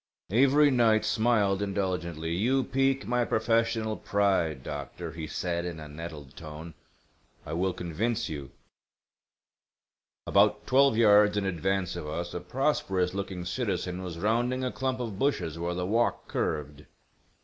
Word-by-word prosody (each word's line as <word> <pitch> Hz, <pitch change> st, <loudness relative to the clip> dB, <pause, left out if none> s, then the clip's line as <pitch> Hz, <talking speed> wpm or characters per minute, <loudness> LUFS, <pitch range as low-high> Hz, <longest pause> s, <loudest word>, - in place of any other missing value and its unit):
Avery 140 Hz, +5 st, +5 dB
Knight 115 Hz, -4 st, +3 dB
smiled 110 Hz, -4 st, +2 dB
indulgently. 90 Hz, -5 st, -2 dB
"You 125 Hz, +9 st, +2 dB
pique 135 Hz, +1 st, +1 dB
my 125 Hz, 0 st, +1 dB
professional 115 Hz, -1 st, +1 dB
pride, 95 Hz, -11 st, 0 dB
doctor," 75 Hz, +4 st, -6 dB
he 80 Hz, 0 st, -6 dB
said 85 Hz, 0 st, -2 dB
in 85 Hz, -2 st, -5 dB
a 75 Hz, -, -8 dB
nettled 75 Hz, -2 st, -9 dB
tone. 80 Hz, 0 st, -9 dB, 0.7 s
"I 75 Hz, -, -5 dB
will 95 Hz, +3 st, +1 dB
convince 105 Hz, +8 st, -2 dB
you." 70 Hz, -3 st, -6 dB, 1.8 s
About -, -, +3 dB
twelve 135 Hz, -3 st, +4 dB
yards 105 Hz, -2 st, +5 dB
in 100 Hz, -, 0 dB
advance 95 Hz, 0 st, -1 dB
of 85 Hz, -3 st, -5 dB
us 85 Hz, +3 st, -4 dB
a -, -, -3 dB
prosperous 95 Hz, -4 st, 0 dB
looking 95 Hz, -2 st, -4 dB
citizen 90 Hz, +1 st, -2 dB
was 90 Hz, -3 st, -6 dB
rounding 120 Hz, +7 st, 0 dB
a 125 Hz, -, -1 dB
clump 130 Hz, -1 st, -2 dB
of 110 Hz, -5 st, -4 dB
bushes 85 Hz, -, 0 dB
where 85 Hz, +1 st, -2 dB
the 90 Hz, 0 st, -2 dB
walk 115 Hz, +5 st, 0 dB
curved. 75 Hz, -1 st, -3 dB
95 Hz, 140 wpm, -28 LUFS, 85-115 Hz, 1.8 s, Avery